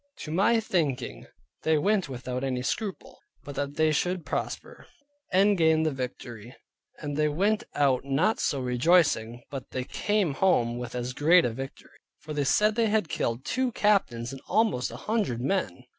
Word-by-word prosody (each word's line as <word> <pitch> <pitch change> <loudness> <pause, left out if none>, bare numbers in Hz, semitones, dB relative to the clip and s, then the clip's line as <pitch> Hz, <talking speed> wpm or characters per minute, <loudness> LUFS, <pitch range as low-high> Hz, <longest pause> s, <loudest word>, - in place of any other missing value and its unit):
To 155 - -6
my 205 +7 +3
thinking 140 - -2 0.3
they 160 -1 +2
went 195 +1 +1
without 125 0 -4
any 130 -2 -2
scruple, 200 +8 -4 0.2
but 145 - -8
that 140 0 -3
they 155 0 +3
should 175 +3 -1
prosper, - - -5 0.4
and 200 +2 +4
gain 160 -2 +3
the 155 - +1
victory. 125 -3 -7 0.4
And 145 -2 -5
they 150 +1 +2
went 200 +8 +1
out 135 -3 +2
not 145 +11 +1
so 140 - 0
rejoicing, 125 -3 +2
but 135 -3 -6
they 130 - -3
came 205 +2 0
home 120 -8 +2
with 120 0 -6
as 125 +1 -3
great 165 +6 +5
a 120 - 0
victory. 135 +4 -9 0.2
For 155 - -8
they 145 -1 0
said 210 +9 +3
they 230 0 +1
had 210 -6 +1
killed 115 -1 -2
two 255 0 0
captains 135 - +1
and 135 -1 -9
almost 215 - +1
an 120 - -8
hundred 205 - -1
men. 135 -2 -1
145 Hz, 175 wpm, -27 LUFS, 125-190 Hz, 0.4 s, great